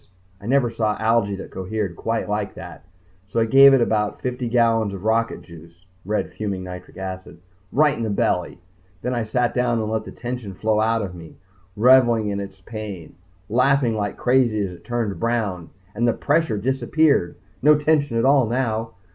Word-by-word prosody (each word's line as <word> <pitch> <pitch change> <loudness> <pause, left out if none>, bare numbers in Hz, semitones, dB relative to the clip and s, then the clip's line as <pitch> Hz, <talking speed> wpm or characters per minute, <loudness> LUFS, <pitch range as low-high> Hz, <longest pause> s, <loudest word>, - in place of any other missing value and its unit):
I 100 - -9
never 125 -2 +2
saw 110 -2 -1
algae 110 -2 +1
that 95 - -9
cohered 95 -1 -4
quite 115 +5 -2
like 105 0 -3
that. 85 -3 -10 0.4
So 100 - -2
I 115 - +3
gave 135 +4 +8
it 135 -2 +4
about 105 -2 0
fifty 125 -1 -3
gallons 115 -4 +2
of 95 - -9
rocket 115 +1 0
juice 85 +1 -15 0.2
red 105 +2 -2
fuming 100 -3 -4
nitric 90 0 -9
acid 95 -2 -7 0.3
right 150 0 +3
in - - -6
the 110 - -1
belly. 90 -3 0 0.5
Then 125 - -1
I 120 -2 -1
sat 120 +2 0
down 125 -2 +1
and 110 0 -2
let 110 -1 -2
the - - -8
tension 120 -5 -6
flow 110 +2 0
out 115 0 +1
of 95 -3 -6
me, 85 -2 -12 0.4
revelling 120 -2 +4
in 100 0 -2
its 95 -1 -8
pain, 105 -5 -8 0.3
laughing 125 +1 +2
like 105 -1 -3
crazy 125 -4 +2
as 95 - -6
it 90 - -13
turned 115 -5 -3
brown 105 -8 -2 0.2
and 120 +1 0
the 115 - +3
pressure 150 -6 0
disappeared. 130 - +1 0.3
No 150 +2 +6
tension 150 -5 +1
at 115 - +2
all 135 -3 +4
now. 115 -2 -2
110 Hz, 185 wpm, -22 LUFS, 100-125 Hz, 0.5 s, gave